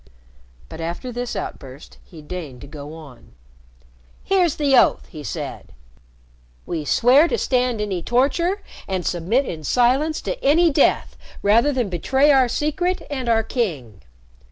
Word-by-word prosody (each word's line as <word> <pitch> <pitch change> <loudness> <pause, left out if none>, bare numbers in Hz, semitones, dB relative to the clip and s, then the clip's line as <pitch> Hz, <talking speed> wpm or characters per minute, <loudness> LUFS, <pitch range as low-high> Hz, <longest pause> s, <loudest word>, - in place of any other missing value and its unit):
But 160 - -9
after 170 +10 -5
this 245 0 -4
outburst, 135 +1 -8
he 160 -4 -14
deigned 150 -6 -7
to 140 - -10
go 145 +1 -9
on. 145 -7 -14 0.9
"Here's 365 -5 +2
the 285 -3 +2
oath," - - +4
he 155 -5 -9
said. 120 - -6 0.9
"We 160 -4 -4
swear 260 - +5
to 470 - -1
stand 250 - 0
any 200 -4 -2
torture 335 - 0 0.2
and 185 -2 -3
submit 190 +11 0
in 160 -7 -6
silence 260 - +2
to - - -5
any 320 +4 +4
death 280 0 +2 0.3
rather 230 +8 +4
than 250 -5 -1
betray 265 - +2
our 265 -3 +4
secret 305 +8 -1
and 260 -4 -3
our 225 -1 +3
king. 150 - -3
240 Hz, 145 wpm, -21 LUFS, -, 0.9 s, swear